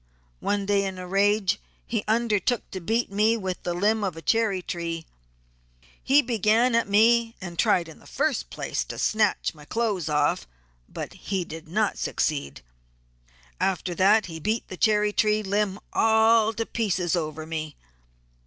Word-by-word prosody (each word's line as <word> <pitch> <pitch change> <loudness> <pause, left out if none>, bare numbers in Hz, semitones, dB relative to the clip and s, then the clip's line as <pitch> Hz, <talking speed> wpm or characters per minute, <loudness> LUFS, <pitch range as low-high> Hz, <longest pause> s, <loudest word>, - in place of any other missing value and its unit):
One 205 -1 -1
day 200 0 +2
in 190 -1 -4
a 180 - -6
rage 200 0 +2 0.3
he 225 -3 -2
undertook 225 +1 0
to 190 - -5
beat 225 +5 0
me 215 +3 +2
with 190 -4 -4
the 175 - -3
limb 210 +4 +1
of 185 -5 -2
a - - -7
cherry 220 -5 +1
tree; 165 -2 -4 1.0
he 285 +2 +4
began 230 +1 +2
at 230 -3 +2
me 230 +2 +4
and 175 -3 -8
tried 170 -2 +3
in 160 - -13
the - - -18
first 285 -2 -1
place - - -3
to - - -7
snatch 215 -2 +1
my 150 -2 -15
clothes 205 -2 -1
off, 145 - +1 0.4
but - - -6
he 190 -3 -3
did 160 0 -9
not 210 +5 0
succeed. 140 - -2 1.0
After 180 -1 -1
that 200 +5 +4
he 165 -2 -7
beat 220 +8 -2
the 185 - -6
cherry 210 +1 +2
tree 215 0 +2
limb 200 0 -1
all 220 0 +4
to 225 +1 -2
pieces 185 -8 -1
over 155 -2 -3
me. 155 -2 -5
205 Hz, 160 wpm, -25 LUFS, 175-220 Hz, 1.0 s, he